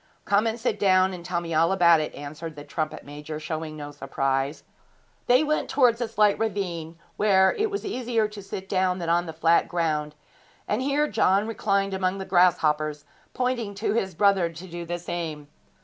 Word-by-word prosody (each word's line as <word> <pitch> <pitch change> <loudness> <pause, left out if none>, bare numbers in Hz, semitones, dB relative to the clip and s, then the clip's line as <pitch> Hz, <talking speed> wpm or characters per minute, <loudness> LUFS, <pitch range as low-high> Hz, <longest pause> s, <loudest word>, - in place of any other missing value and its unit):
'Come 205 +3 +2
and 225 +1 -2
sit 225 -3 -1
down, 185 -1 +4
and 175 -2 -8
tell 175 0 -2
me 165 -1 -5
all 165 +3 +3
about 170 -4 +5
it,' 155 - -4
answered 155 +3 -7
the 145 - -9
trumpet 155 0 -4
major, 150 +1 -7
showing 155 0 -5
no 145 -1 -7
surprise. 135 0 -2 0.6
They 250 +4 +5
went 305 0 -1
towards 250 -3 +3
a 240 - 0
slight 210 -1 +2
ravine, 175 -7 -3 0.2
where 190 -2 +4
it 430 +1 0
was 405 0 -4
easier 245 - 0
to 210 -1 -10
sit 190 0 -7
down 185 -2 +1
than 170 -2 -4
on 175 +1 +2
the - - -4
flat 165 +1 +3
ground, 155 -3 -1 0.5
and 210 +4 0
here 285 +3 +1
John 195 -6 +2
reclined 200 -3 0
among 190 0 0
the 190 - -5
grasshoppers, 155 -5 +2 0.3
pointing 245 -5 -1
to 205 +1 -1
his 190 -6 -1
brother 195 -2 +3
to 165 +3 -10
do 170 -1 -7
the 175 +1 -2
same. 160 -4 -5
185 Hz, 190 wpm, -25 LUFS, 160-210 Hz, 0.6 s, about